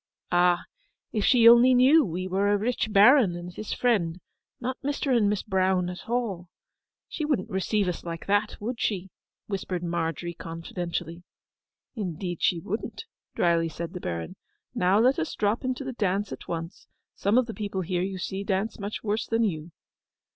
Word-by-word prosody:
'Ah, 175 0 +3 0.5
if 215 -3 -1
she 235 -1 +6
only 240 +2 +8
knew 275 +6 +6
we 185 -3 -3
were 195 +2 +1
a 205 - +3
rich 220 +1 -1
Baron 210 -1 +6
and 175 +1 -7
his 215 - -6
friend, 205 -10 +1
and 175 - -15 0.4
not 255 +1 -4
Mr. 280 -2 0
and 210 -4 +3
Miss 205 -2 -1
Brown 185 -2 +1
at 180 - -10
all, 210 -8 -2 0.6
she 310 - -5
wouldn't 295 -4 -1
receive 195 +1 0
us 180 - -3
like 165 -1 -6
that, 205 +1 +1
would 235 +3 -4
she?' 190 -3 -1 0.3
whispered 185 -3 -3
Margery 170 0 -2
confidentially. 170 0 -5 0.7
'Indeed, 180 - -4
she 175 - +2
wouldn't!' 215 - -5 0.3
drily 170 -1 +2
said 170 +1 -6
the 180 - -6
Baron. 85 -2 -4 0.4
'Now 185 +2 +3
let 250 +5 +4
us 155 - -3
drop 210 +4 0
into 255 +1 -2
the 265 -1 -5
dance 205 -2 -1
at - - -8
once; 165 +1 -6 0.3
some 205 +4 +1
of 255 - +4
the 225 - -6
people 200 -3 -3
here, 180 0 -1
you 190 +1 -3
see, 190 +2 -4
dance 200 +3 -1
much 200 +1 -5
worse 215 0 -1
than 230 0 +1
you. 165 -6 -2
195 Hz, 175 wpm, -27 LUFS, 175-225 Hz, 0.7 s, only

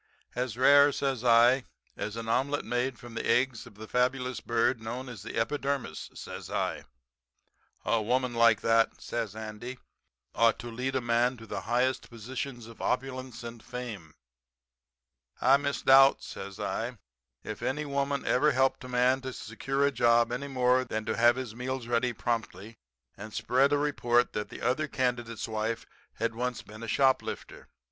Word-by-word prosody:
"'As 125 -2 -3
rare,' 140 +2 +7
says 135 -4 -2
I, 120 +2 +5 0.3
'as 105 +1 -4
an 115 -1 -5
omelet 135 +5 0
made 120 +1 -1
from 120 -2 -11
the - - -3
eggs 125 -2 +1
of 110 - -15
the 110 +1 -9
fabulous 125 +1 0
bird 115 +1 +1
known 120 +4 -5
as 120 -6 -8
the 115 - -7
epidermis,' 140 - -2
says - - -8
I. - - -2 1.0
"'A 115 - +2
woman 125 +3 0
like 115 -2 +4
that,' 115 0 +2
says 115 -4 -4
Andy, 110 +3 -7 0.6
'ought 115 0 +4
to 120 0 -7
lead 130 +3 -3
a 130 - +1
man 120 +2 +1
to 115 - -11
the - - -5
highest 125 +2 +1
positions 120 +1 -6
of 115 0 -12
opulence 130 -2 -3
and 115 -1 -8
fame.' 115 -10 -7 1.2
"'I 135 +2 +6
misdoubt,' 135 -1 +5
says 100 +1 -8
I, 115 +3 -3 0.5
'if - - -6
any 150 +3 -1
woman 140 0 -1
ever 145 +4 +3
helped 130 0 +2
a 130 - -8
man 125 +2 +2
to 130 0 -5
secure 135 +5 -2
a 140 - +2
job 120 -2 +3
any 130 +3 -3
more 130 -1 +2
than 110 -3 -4
to - - -1
have 120 +1 +5
his 130 -4 -5
meals 125 +1 -4
ready 120 +1 +1
promptly 115 -2 -4 0.4
and 110 +2 -9
spread 135 +3 +2
a 145 - +4
report 125 -4 +1
that 105 - -3
the - - -9
other 130 +6 +1
candidate's 120 -4 -2
wife 110 +1 -2 0.3
had - - -1
once 125 +1 -3
been 110 +1 -12
a 115 - -6
shoplifter. 130 +3 0
125 Hz, 170 wpm, -29 LUFS, 115-130 Hz, 1.2 s, rare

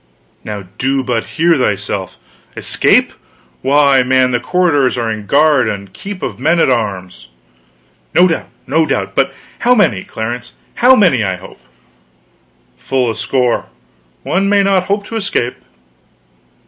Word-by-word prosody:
"Now 105 -2 -6 0.2
do 135 +1 0
but 120 -2 -2
hear 170 +1 +4
thyself! 105 -6 -2 0.4
Escape? - - +2 0.5
Why, 140 -1 +4
man, 130 0 +2
the 120 - +1
corridors 145 -5 +1
are 115 -2 -1
in 105 -2 -6
guard 145 -4 +3
and 100 -2 -6
keep 200 -1 -8
of - - -4
men 165 +6 +2
at 135 - +3
arms." 95 - -3 0.9
"No 180 +1 +6
doubt, 165 - -3 0.2
no 155 +3 +1
doubt. - - -2
But - - +1 0.3
how 250 +1 +3
many, 140 - +2
Clarence? 120 +2 -6 0.3
Not 255 +2 +7
many, 165 - +3
I 95 -2 -1
hope?" 90 +1 -13 1.2
"Full 130 -3 0
a - - -6
score. 125 +2 0 0.6
One 195 +2 0
may 200 -1 +3
not 195 -2 +2
hope 200 +1 -1
to 230 - -7
escape." 160 - -2
130 Hz, 145 wpm, -15 LUFS, 115-175 Hz, 1.2 s, Not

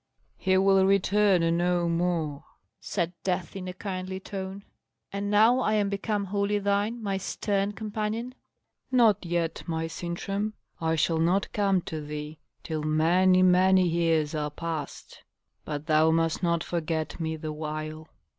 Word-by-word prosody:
"He 190 0 +1
will 195 0 +4
return 195 -3 +3
no 175 0 +1
more," 165 -4 -1 0.4
said 175 -3 -2
Death, 180 -2 -2
in 185 -1 -5
a 180 - -4
kindly 185 -1 -5
tone. 195 0 -6 0.5
"And 200 +1 -3
now 220 +5 +5
I 215 -4 +1
am 205 -2 +1
become 200 +1 -1
wholly 200 +1 0
thine, 205 +3 0
my 195 -2 -1
stern 200 +1 -1
companion?" 215 +3 -3 0.6
"Not 225 -6 +4
yet, 170 -1 -1
my 165 -1 -1
Sintram. 195 +6 -3 0.3
I 160 0 +1
shall 160 +1 +1
not 180 +5 +1
come 195 -3 +2
to 155 -1 -5
thee 150 +1 -6 0.2
till 155 -2 -3
many, 175 +5 +3
many 185 0 +5
years 165 -3 +1
are 150 -1 -1
past. 160 -1 -6 0.4
But 150 -1 -4
thou 155 0 +4
must 165 0 +1
not 170 -2 +1
forget 160 -2 -3
me 160 -1 -2
the 155 0 -5
while." 155 +1 -5
180 Hz, 145 wpm, -27 LUFS, 160-200 Hz, 0.6 s, now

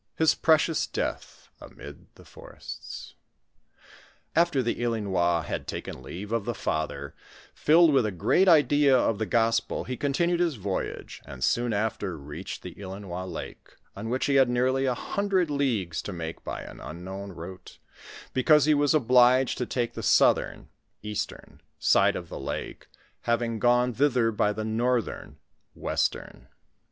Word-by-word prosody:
— - - -51
HIS 160 -1 +4
PRECIOUS 160 0 +2
DEATH - - -5
AMID 70 0 -12
THE - - -17
FORESTS. - - -10 1.2
Afteb 165 -5 +3
the 120 0 -2
Ilinois 95 -8 0
had - - -5
taken - - -6
leave 100 +4 -8
of 115 -3 -1
the 120 - -2
father, 70 -5 -3 0.4
filled 160 0 +5
with 130 -5 +3
a - - -2
great 105 - +2
idea 145 -4 +5
of 115 -4 +1
the 110 - -1
gospel, 115 -1 +1
he 130 - -4
continued 170 +6 0
his 170 -4 +1
voyage, 100 -3 -4
and 65 0 -7
soon 120 0 +1
after 105 -4 -2
reached 75 +5 -8
the 90 - -7
Ilinois 95 -2 -6
lake, 80 - -9 0.2
on 105 +3 -5
which 130 +2 0
he 140 -1 +3
had 130 - +3
nearly 130 +2 +1
a 125 - +1
hun 200 +9 -3
dred 185 -5 +2
leagues 115 - -1
to - - -6
make 85 -2 -6
by - - -5
an - - -11
unknown 95 +4 -7
route, 90 +2 -10 0.6
because 145 +3 +4
he 155 - +4
was 145 +1 +3
obliged 125 -1 +4
to 125 - -2
take 120 -2 -2
the - - -6
southern - - +2 0.3
[eastern] 105 -1 -5 0.2
side - - +3
of - - -5
the - - -7
lake, 70 - -6 0.4
hav 120 0 +1
ing 115 -1 -3
gone 125 +2 +3
thither 125 -3 +2
by 105 -1 +1
the 110 +1 -4
northern 120 +2 -1 0.4
[westera]. - - -2
115 Hz, 160 wpm, -27 LUFS, 95-135 Hz, 1.2 s, filled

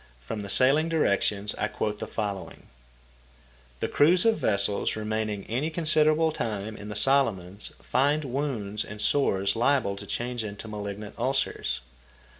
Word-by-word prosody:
From 85 - -6
the 100 - -7
"Sailing 135 +10 +4
Directions" 105 -9 +1
I 105 - +1
quote 105 -1 -3
the - - -4
following: 100 -3 -5 1.2
"The - - +1
crews 175 +6 +4
of 225 -1 +3
vessels 100 -1 +2
remaining 110 -1 -2
any 130 +8 -1
considerable 155 -1 +3
time 110 -6 -4
in 105 0 -9
the 105 - -5
Solomons 105 -7 +1
find 145 +4 +1
wounds 120 -6 -2
and 105 0 -9
sores 100 -6 +1
liable 120 -4 +2
to - - -9
change 120 -1 -3
into 105 +1 -7
malignant 105 0 -6
ulcers." 120 - -1
110 Hz, 140 wpm, -27 LUFS, 100-140 Hz, 1.2 s, Sailing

